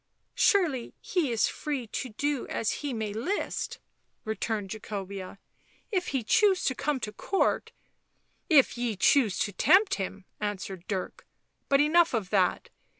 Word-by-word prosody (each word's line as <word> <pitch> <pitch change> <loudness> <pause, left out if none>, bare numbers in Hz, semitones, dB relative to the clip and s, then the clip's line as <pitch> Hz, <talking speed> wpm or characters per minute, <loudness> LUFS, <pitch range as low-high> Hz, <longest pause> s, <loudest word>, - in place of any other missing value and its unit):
" - - -48
Surely 320 - +2
he 335 -9 -1
is 230 - +2
free 285 -5 -3
to 250 +3 -4
do 285 +4 -2
as 220 - -1
he 290 -2 -2
may 220 -4 -3
list," 265 - -2 0.5
returned 215 -2 -2
Jacobea. 200 -3 -6 0.3
" - - -33
If 370 -3 0
he 265 -4 -1
choose 395 - +3
to 260 - +1
come 275 +1 -1
to 210 - -3
Court... 380 - 0 0.3
." - - -46
" - - -43
If 250 - 0
ye 240 -3 -1
choose 220 +1 +3
to 205 - 0
tempt 380 - +4
him," 195 0 -5
answered 195 -3 -4
Dirk. 190 -3 -4 0.2
" - - -48
But 275 0 +5
enough 325 -1 +4
of 205 -5 -3
that." 190 -3 +1
235 Hz, 165 wpm, -28 LUFS, 205-295 Hz, 0.5 s, But